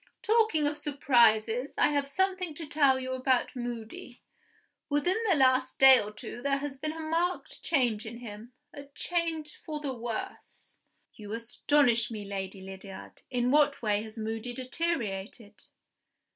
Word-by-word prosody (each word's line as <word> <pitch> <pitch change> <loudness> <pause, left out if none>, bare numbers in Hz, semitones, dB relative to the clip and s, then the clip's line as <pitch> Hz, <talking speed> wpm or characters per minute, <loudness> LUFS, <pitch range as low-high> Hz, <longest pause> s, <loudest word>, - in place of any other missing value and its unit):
Talking 435 -9 +3
of 295 +1 -1
surprises, 245 -4 +2
I - - +4
have 285 -1 0
something 370 +1 -1
to 325 - -6
tell 285 -3 +3
you 260 0 -4
about 260 -1 0
Moody. 240 0 -7 0.7
Within 295 +7 +1
the 365 - +5
last 260 -2 +3
day 265 -1 +9
or 210 0 -6
two 215 +3 -9
there 275 +1 +1
has 280 -1 -4
been 305 +3 -4
a 325 - -8
marked 330 +3 -2
change 240 -7 +1
in 230 +1 -7
him 230 0 -10 0.2
a 285 -1 -9
change 330 -3 -3
for 305 -1 -5
the 285 -3 -3
worse." 235 -2 -7 0.3
"You 210 -1 -9
astonish 235 +1 +2
me, 215 -3 -6
Lady 195 -1 -5
Lydiard! 190 0 -10
In 245 -1 0
what 290 -2 +3
way 210 -1 +1
has 220 +1 -9
Moody 225 +2 -4
deteriorated?" 235 - -4
260 Hz, 150 wpm, -29 LUFS, 225-295 Hz, 0.7 s, day